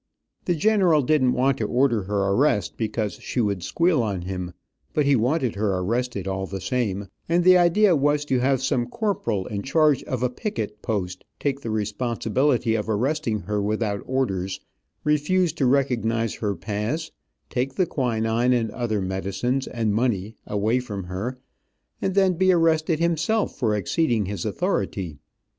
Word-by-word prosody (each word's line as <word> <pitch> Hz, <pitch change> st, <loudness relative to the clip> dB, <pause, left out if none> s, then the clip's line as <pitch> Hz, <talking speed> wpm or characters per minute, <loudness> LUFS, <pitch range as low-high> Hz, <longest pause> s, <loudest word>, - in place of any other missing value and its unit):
The 175 Hz, -, +1 dB
general 180 Hz, -4 st, +3 dB
didn't 130 Hz, -2 st, +3 dB
want 135 Hz, +1 st, +1 dB
to 110 Hz, -, 0 dB
order 120 Hz, -1 st, +2 dB
her 100 Hz, 0 st, 0 dB
arrest, 105 Hz, 0 st, +2 dB
because 110 Hz, -4 st, -2 dB
she -, -, -3 dB
would 100 Hz, -5 st, 0 dB
squeal 170 Hz, -, +2 dB
on 100 Hz, -6 st, -2 dB
him, 90 Hz, -1 st, -5 dB, 0.4 s
but 150 Hz, -, +2 dB
he 140 Hz, 0 st, +4 dB
wanted 125 Hz, +1 st, +1 dB
her 100 Hz, -2 st, 0 dB
arrested 110 Hz, +1 st, -2 dB
all 95 Hz, 0 st, -2 dB
the 95 Hz, 0 st, -5 dB
same, 100 Hz, -1 st, -2 dB, 0.2 s
and 175 Hz, +1 st, +3 dB
the 185 Hz, +1 st, +7 dB
idea 180 Hz, +2 st, +5 dB
was 145 Hz, +1 st, +1 dB
to 130 Hz, -3 st, +1 dB
have 130 Hz, 0 st, +1 dB
some 125 Hz, -3 st, 0 dB
corporal 200 Hz, -, -1 dB
in 100 Hz, -1 st, -4 dB
charge 150 Hz, +3 st, +3 dB
of 130 Hz, -1 st, -3 dB
a 125 Hz, -, +2 dB
picket 110 Hz, -, -4 dB
post 95 Hz, -4 st, -3 dB, 0.2 s
take 140 Hz, -1 st, -1 dB
the 115 Hz, -, -5 dB
responsibility 115 Hz, +3 st, 0 dB
of 110 Hz, 0 st, -2 dB
arresting 115 Hz, 0 st, 0 dB
her 105 Hz, 0 st, -2 dB
without 105 Hz, 0 st, -1 dB
orders, 95 Hz, -8 st, -1 dB, 0.4 s
refuse 150 Hz, +3 st, +2 dB
to 140 Hz, -6 st, +1 dB
recognize 115 Hz, -4 st, +1 dB
her 105 Hz, -2 st, -2 dB
pass, 110 Hz, -, -3 dB, 0.4 s
take 130 Hz, +2 st, -1 dB
the 185 Hz, -, +2 dB
quinine 120 Hz, -3 st, +1 dB
and 115 Hz, -3 st, 0 dB
other 110 Hz, -5 st, -2 dB
medicines, 100 Hz, +8 st, -2 dB
and 110 Hz, -4 st, -1 dB
money 110 Hz, -2 st, 0 dB
away 105 Hz, +4 st, +1 dB
from 105 Hz, -6 st, -5 dB
her, 95 Hz, +8 st, -4 dB, 0.6 s
and 190 Hz, -, -1 dB
then 190 Hz, -2 st, +4 dB
be 185 Hz, +2 st, +3 dB
arrested 165 Hz, -2 st, +2 dB
himself 170 Hz, +6 st, 0 dB
for 110 Hz, -6 st, +1 dB
exceeding 115 Hz, -, +1 dB
his 100 Hz, -2 st, -4 dB
authority. 85 Hz, -7 st, -2 dB
120 Hz, 160 wpm, -24 LUFS, 105-145 Hz, 0.6 s, the